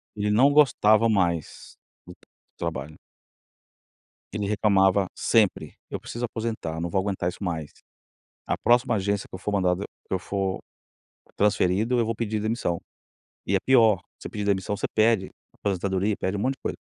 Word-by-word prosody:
Ele 105 0 -1
não 130 +7 +5
gostava 115 -7 +4
mais 85 -6 -1 0.3
do 90 - -12 0.4
trabalho. 75 +4 -5 1.3
Ele 105 -1 -3
reclamava 100 -2 +3
sempre, 110 -4 +1
eu - - -4
preciso 120 +1 -4
aposentar, 110 -9 -4
não 85 +1 -2
vou 95 - +1
aguentar 95 -3 -1
isso 90 - -8
mais. 80 -5 -3 0.8
A - - 0
próxima 120 0 +3
agência 100 0 -1
que - - -10
eu - - -8
for 105 - -3
mandado 95 -1 +1 0.2
que - - -4
eu 95 - 0
for 95 -1 -2 0.8
transferido 105 +3 +2
eu 115 - +3
vou 115 +1 -2
pedir 110 -1 -2
demissão. 110 -5 -1 0.6
E 100 - +1
é - - +3
pior, 115 -7 +4 0.2
você - - -8
pedir 105 -1 -4
demissão 100 0 0
você - - -2
pede 110 -3 +3 0.2
aposentadoria, 100 +1 -1
pede 95 +2 -2
um 100 - -3
monte 130 +4 0
de - - -31
coisa. - - -3
100 Hz, 165 wpm, -25 LUFS, 95-110 Hz, 1.3 s, não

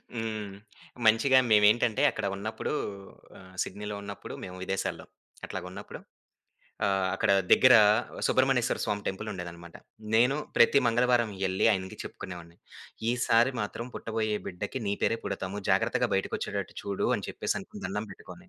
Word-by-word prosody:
హ్మ్. 110 -3 -4 0.5
మంచిగా 125 +5 +5
మేమేంటంటే 105 +1 +4
అక్కడ - - -4
ఉన్నప్పుడు 110 +3 -4 0.7
ఆహ్, 95 0 -15
సిడ్నీ‌లో 105 +2 -6
ఉన్నప్పుడు 100 0 -8
మేము 90 - -7
విదేశాల్లో 95 0 -3 0.4
అట్లాగున్నప్పుడు 90 0 -7 0.9
ఆహ్, 95 -1 +1
అక్కడ 110 - +1 0.2
దగ్గెర 130 -1 +8 0.5
సుబ్రహ్మణ్యేశ్వర 130 -2 +2
స్వామి 105 -1 -2
టెంపులుండేదనమాట. 90 -4 -6 0.4
నేను 125 +5 +4 0.2
ప్రతి 140 +4 +6
మంగళవారం 120 -1 +3 0.2
ఎళ్లి 95 0 +1
ఆయనకి 95 -1 -4
చెప్పుకునేవాడిని. 85 -2 -9 0.5
"ఈసారి 120 +1 +3
మాత్రం 105 +3 -4
పుట్టబోయే 110 -1 -2
బిడ్డకి 100 +7 -5
నీ 100 - +1
పేరే 115 - +2
పుడతాము 95 +2 -4
జాగ్రత్తగా - - +2
బయటకొచ్చేటట్టు - - -3
చూడు" 100 -1 -1
అని - - -6
చెప్పేసనుకుని - - -4
దండం 105 +3 -3
పెట్టుకొని, 180 - -13
105 Hz, 120 wpm, -28 LUFS, 95-115 Hz, 0.9 s, దగ్గెర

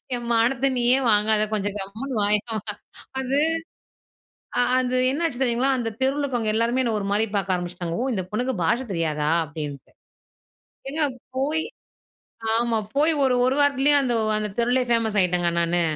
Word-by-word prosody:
என் 240 -1 -6
மானத்தை 240 +4 +2
நீயே 245 +2 +3
வாங்காத. 210 +1 +3
கொஞ்சம் 205 -1 -2
கம்முனு 225 +7 -6
வாயே. 205 +1 +3 0.8
அது 265 +2 0 1.4
அது 255 0 +1
என்ன 300 +5 -2
ஆச்சு 260 -6 -3
தெரியுங்களா, 250 +2 +1
அந்த 230 -2 -2
தெருவுல 275 +2 +1
இருக்கவங்க 240 -6 -1
எல்லாருமே 235 +3 +1
என்னை 235 -3 0
ஒரு 200 - -4
மாரி 210 +2 +2
பாக்க 195 -2 0
ஆரம்பிச்சுட்டாங்க. 175 -1 -4
ஓ - - 0
இந்த 190 -4 -2
பொண்ணுக்கு 250 +4 -1
பாஷை 235 +10 +1
தெரியாதா 155 -4 -1 0.2
அப்டின்ட்டு. 145 -2 -7 1.0
ஏங்க 310 +2 0 0.3
போய் 300 +4 0 0.9
ஆமா 235 -1 +1 0.2
போய் 310 +3 +5
ஒரு 260 -2 +3
1 260 +2 +1
வாரத்துலேயும் 285 0 +4
அந்த 250 -3 0 0.2
அந்த 210 -1 -3
தெருவிலே 245 +2 +2
ஃபேமஸ் 225 -3 +1
ஆயிட்டேங்க 180 -1 +1
நானு. 170 +1 +1
235 Hz, 150 wpm, -23 LUFS, 200-260 Hz, 1.4 s, போய்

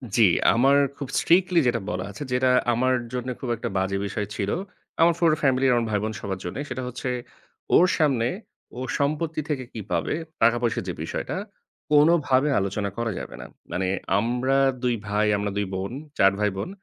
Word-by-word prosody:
জি। 120 - +4 0.3
আমার 135 +4 +4 0.2
খুব 140 - -5
strictly 180 0 +4
যেটা 120 - +1
বলা 90 0 -3
আছে, 105 - -7
যেটা 125 +1 +3 0.2
আমার 130 +2 +2 0.2
জন্যে 125 0 -3
খুব 130 - -5
একটা 115 - -4
বাজে 95 +1 0
বিষয় 100 +1 -3
ছিল। 100 -1 -2 0.5
আমার 170 +1 +6
পুরো 165 -3 +4
ফ্যামিলি 135 -1 +2
আর - - +4
আমার 115 -1 0
ভাই-বোন 110 +1 -1
সবার 95 -1 -4
জন্যে 90 +10 -4
সেটা 130 0 -4
হচ্ছে 125 +1 -4 0.7
ওর 180 - +7
সামনে 135 -7 +2 0.5
ওর 130 - -4
সম্পত্তি 155 +2 -1
থেকে 135 -4 -1
কি 110 - -5
পাবে, 85 -1 0 0.3
টাকা-পয়সার 115 0 +2
যে - - -2
বিষয়টা, - - -4 0.5
কোনভাবে 150 -2 +4
আলোচনা 100 +1 -2
করা 115 -1 -1
যাবে - - -8
না। - - -8 0.3
মানে 95 +1 -1 0.3
আমরা 125 +4 +1 0.3
২ 125 -1 +2
ভাই, 105 +1 +1
আমরা 100 0 -2
২ 105 - 0
বোন, 95 +2 -3 0.3
৪ 95 - +6
ভাই-বোন। 105 - -1
120 Hz, 175 wpm, -25 LUFS, 105-135 Hz, 0.7 s, ওর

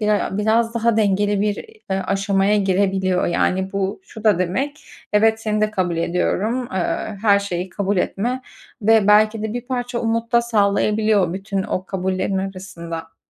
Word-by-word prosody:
biray 210 -1 +2
a 195 - -3
biraz 225 +2 +2
daha 235 -1 +2
dengeli 205 -1 +2
bir, 205 0 +1 0.4
eee, 190 0 0
aşamaya 195 +1 +2
girebiliyor. 190 -1 +1
Yani, 190 +2 0
bu, 195 - -2
şu 220 - -12
da 210 -5 +4
demek, 270 - -2 0.3
evet 220 +1 +3
seni 215 -1 -1
de 215 0 +2
kabul 180 -4 -1
ediyorum, 200 +8 -1
eee, 190 +3 -2
her 200 -2 +5
şeyi 185 -2 -3
kabul 200 +1 -1
etme 240 +8 -1 0.4
ve 220 -1 +4
belki 215 +1 +4
de 220 -1 -3
bir 245 0 -5
parça 245 -1 -3
umut 230 0 -1
da 235 - +6
sağlayabiliyor 210 -2 +2
o - - -4
bütün 195 +1 -3
o 185 - -3
kabullerin 190 0 -1
arasında. 180 -4 -6
205 Hz, 165 wpm, -21 LUFS, 190-220 Hz, 0.4 s, da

